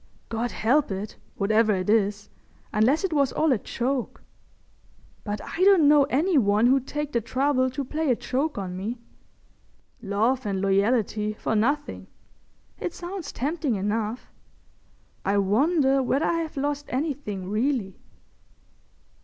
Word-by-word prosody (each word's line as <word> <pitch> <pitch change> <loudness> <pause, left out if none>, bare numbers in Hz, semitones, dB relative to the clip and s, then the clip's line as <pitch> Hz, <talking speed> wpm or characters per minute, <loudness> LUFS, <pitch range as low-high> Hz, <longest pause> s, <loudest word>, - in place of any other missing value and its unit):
God 230 +1 -2
help 270 +8 +1
it, 195 +2 -5 0.2
whatever 215 +1 +2
it 185 -1 -3
is—unless 215 - 0
it 375 -4 -1
was 280 -3 +2
all 315 -1 +1
a 245 - +2
joke. 250 +3 -3 1.0
But 205 -1 -3
I - - -8
don't 380 -6 +6
know 290 -1 +6
any 300 +4 +2
one 210 0 +3
who'd 265 +1 +3
take 295 0 -3
the 235 - 0
trouble 260 +2 +1
to 260 +2 -4
play 310 +3 -2
a 250 - +4
joke 260 +5 -2
on 185 -2 -4
me.... 210 +6 -4 1.0
Love 230 +6 0
and 200 -3 -2
loyalty 210 +2 +1
for 220 - -2
nothing. 285 +7 -1 0.7
It 350 - -4
sounds 350 -3 -6
tempting 290 -1 -1
enough. 210 +4 -3 0.9
I 200 +1 +1
wonder 270 - +3
whether 270 +4 +1
I 335 - +1
have 320 -3 -5
lost 290 +1 -2
anything 255 - -3
really?" 220 -3 -1
250 Hz, 135 wpm, -25 LUFS, 210-290 Hz, 1.0 s, don't